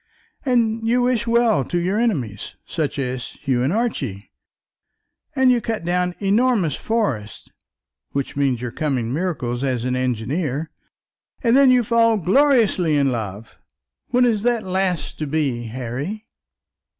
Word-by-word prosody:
and 230 Hz, -4 st, +1 dB
you 245 Hz, +2 st, +3 dB
wish 245 Hz, -2 st, +1 dB
well 230 Hz, -, +3 dB
to 175 Hz, -, -3 dB
your 185 Hz, +5 st, 0 dB
enemies, 135 Hz, -, -2 dB
such 155 Hz, -4 st, -3 dB
as 130 Hz, -2 st, -4 dB
Hugh 130 Hz, -4 st, +1 dB
and 130 Hz, +4 st, +1 dB
Archie; 145 Hz, -, -2 dB, 1.0 s
and 260 Hz, -2 st, +4 dB
you 245 Hz, -1 st, +2 dB
cut 225 Hz, -4 st, -3 dB
down 180 Hz, +1 st, 0 dB
enormous 205 Hz, -, +2 dB
forests, 140 Hz, -, -2 dB, 0.6 s
which 140 Hz, -1 st, -3 dB
means 135 Hz, -4 st, 0 dB
your 120 Hz, -, -3 dB
coming 130 Hz, -5 st, -2 dB
miracles 135 Hz, -7 st, -2 dB
as 130 Hz, -4 st, -1 dB
an 125 Hz, 0 st, -1 dB
engineer; 130 Hz, +5 st, -2 dB, 0.7 s
and 235 Hz, 0 st, +4 dB
then 275 Hz, -1 st, +6 dB
you 250 Hz, -1 st, +5 dB
fall 230 Hz, 0 st, +3 dB
gloriously 200 Hz, -, +3 dB
in 140 Hz, -2 st, +2 dB
love. 110 Hz, -2 st, -6 dB, 0.5 s
When 250 Hz, 0 st, +3 dB
is 220 Hz, -4 st, +1 dB
that 235 Hz, -1 st, +1 dB
last 185 Hz, -2 st, -1 dB
to 155 Hz, -, -2 dB
be, 135 Hz, -6 st, -1 dB
Harry?" 130 Hz, -, -5 dB
175 Hz, 140 wpm, -21 LUFS, -, 1.0 s, then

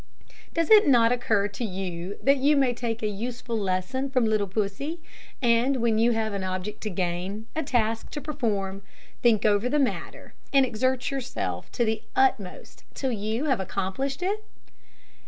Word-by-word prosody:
Does 330 Hz, +4 st, +1 dB
it 425 Hz, -5 st, +8 dB
not 235 Hz, -4 st, +5 dB
occur 220 Hz, -4 st, +1 dB
to 210 Hz, -, -6 dB
you 185 Hz, -2 st, -4 dB
that 275 Hz, +1 st, +5 dB
you 285 Hz, +3 st, +3 dB
may 265 Hz, -3 st, +3 dB
take 230 Hz, -1 st, -3 dB
a -, -, +2 dB
useful 235 Hz, +3 st, -4 dB
lesson 200 Hz, +7 st, -1 dB
from 255 Hz, -3 st, +2 dB
little 215 Hz, -2 st, +1 dB
Pussy, 215 Hz, -, -2 dB, 0.4 s
and 240 Hz, +3 st, +3 dB
when 230 Hz, -3 st, +1 dB
you 235 Hz, +1 st, +4 dB
have 220 Hz, -1 st, -1 dB
an 200 Hz, -1 st, -3 dB
object 185 Hz, +3 st, -4 dB
to 215 Hz, -, -3 dB
gain, 185 Hz, +3 st, -3 dB
a 320 Hz, -, 0 dB
task 230 Hz, -6 st, 0 dB
to 295 Hz, -, -5 dB
perform, 210 Hz, -10 st, -2 dB, 0.4 s
think 225 Hz, -3 st, +3 dB
over 210 Hz, +3 st, +3 dB
the 300 Hz, -, +1 dB
matter, 275 Hz, -3 st, -2 dB, 0.2 s
and 275 Hz, -1 st, +5 dB
exert 255 Hz, +3 st, 0 dB
yourself 270 Hz, -2 st, -4 dB
to 240 Hz, -, +1 dB
the 220 Hz, -1 st, -1 dB
utmost 250 Hz, -8 st, 0 dB
till 265 Hz, -2 st, -1 dB
you 220 Hz, +5 st, -2 dB
have 265 Hz, -7 st, +2 dB
accomplished 195 Hz, -, -2 dB
it? 415 Hz, +3 st, -1 dB
230 Hz, 170 wpm, -26 LUFS, 200-265 Hz, 0.4 s, it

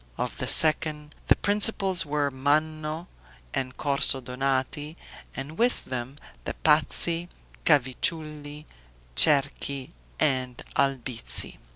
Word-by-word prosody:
Of -, -, -5 dB
the -, -, -3 dB
second, 155 Hz, -1 st, +3 dB
the -, -, +5 dB
principals 200 Hz, -4 st, 0 dB
were 145 Hz, -1 st, -1 dB
Manno 155 Hz, +4 st, -2 dB, 0.5 s
and 130 Hz, 0 st, -4 dB
Corso 140 Hz, -2 st, 0 dB
Donati, 135 Hz, +4 st, -3 dB, 0.4 s
and 145 Hz, +4 st, -7 dB
with 245 Hz, +2 st, +1 dB
them 130 Hz, +1 st, -6 dB, 0.3 s
the -, -, -6 dB
Pazzi, 165 Hz, +2 st, +4 dB, 0.4 s
Cavicciulli, 150 Hz, +2 st, -1 dB, 0.5 s
Cerchi, 140 Hz, -, +3 dB, 0.3 s
and 130 Hz, -3 st, 0 dB, 0.2 s
Albizzi. 130 Hz, -4 st, -1 dB
145 Hz, 95 wpm, -25 LUFS, 135-155 Hz, 0.5 s, the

